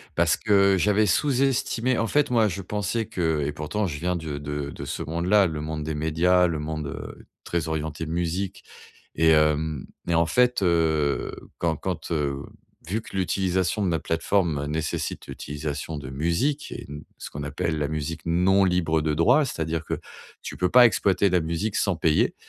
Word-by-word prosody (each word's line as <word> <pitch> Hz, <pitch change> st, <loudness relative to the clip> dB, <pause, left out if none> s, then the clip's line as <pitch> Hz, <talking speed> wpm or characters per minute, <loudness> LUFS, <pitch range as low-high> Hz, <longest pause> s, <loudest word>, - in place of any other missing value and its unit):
Parce -, -, +3 dB
que 100 Hz, -2 st, +4 dB
j'avais 105 Hz, +3 st, +3 dB
sous-estimé 130 Hz, 0 st, +1 dB
en 115 Hz, -, 0 dB
fait, 145 Hz, +6 st, +2 dB
moi, 115 Hz, -3 st, +3 dB
je 95 Hz, +1 st, -4 dB
pensais 105 Hz, +4 st, -2 dB
que 80 Hz, -6 st, -1 dB
et 75 Hz, -, -3 dB
pourtant 85 Hz, +8 st, -2 dB
je 75 Hz, -4 st, -5 dB
viens 90 Hz, +2 st, -1 dB
du 80 Hz, -1 st, -7 dB
de 75 Hz, 0 st, -4 dB
de -, -, -7 dB
ce -, -, -4 dB
monde-là, 90 Hz, +6 st, +2 dB
le 80 Hz, -2 st, -4 dB
monde 75 Hz, 0 st, -4 dB
des 80 Hz, 0 st, -3 dB
médias, 85 Hz, +4 st, +3 dB
le 80 Hz, -3 st, -2 dB
monde, 75 Hz, 0 st, -4 dB
heu, -, -, -8 dB, 0.2 s
très 85 Hz, -2 st, -2 dB
orienté 80 Hz, 0 st, -3 dB
musique. 90 Hz, +3 st, -2 dB, 0.5 s
Et 80 Hz, +1 st, +4 dB
hem 75 Hz, -2 st, +2 dB, 0.2 s
et -, -, +2 dB
en 85 Hz, 0 st, +4 dB
fait, 125 Hz, +6 st, +2 dB
heu, 80 Hz, -5 st, +1 dB, 0.3 s
quand 85 Hz, -2 st, 0 dB
quand, 90 Hz, 0 st, -4 dB
heu, 70 Hz, -3 st, -1 dB, 0.4 s
vu 105 Hz, +6 st, -1 dB
que 110 Hz, -, -12 dB
l'utilisation 95 Hz, +1 st, 0 dB
de 90 Hz, -, +1 dB
la 80 Hz, -, 0 dB
plateforme 80 Hz, -3 st, 0 dB
nécessite 75 Hz, +1 st, -3 dB
l'utilisation 75 Hz, +1 st, -5 dB
de 70 Hz, -3 st, -7 dB
musique 85 Hz, -, -1 dB
et -, -, -8 dB
d 75 Hz, +1 st, -8 dB
ce -, -, -8 dB
qu'on 70 Hz, -, -6 dB
appelle 75 Hz, +2 st, -2 dB
la 75 Hz, -1 st, 0 dB
musique 80 Hz, +1 st, -4 dB
non 90 Hz, +4 st, +3 dB
libre 85 Hz, -3 st, +1 dB
de 75 Hz, 0 st, 0 dB
droit, 85 Hz, -, +4 dB
c'est-à-dire 80 Hz, -, -3 dB
que, -, -, -3 dB, 0.4 s
tu -, -, -7 dB
peux 90 Hz, -, +1 dB
pas 125 Hz, +5 st, +8 dB
exploiter 100 Hz, -3 st, +3 dB
la 90 Hz, -1 st, +3 dB
musique 85 Hz, +7 st, -2 dB
sans 100 Hz, -, +1 dB
payer. 80 Hz, -1 st, +2 dB
85 Hz, 185 wpm, -25 LUFS, 75-95 Hz, 0.5 s, pas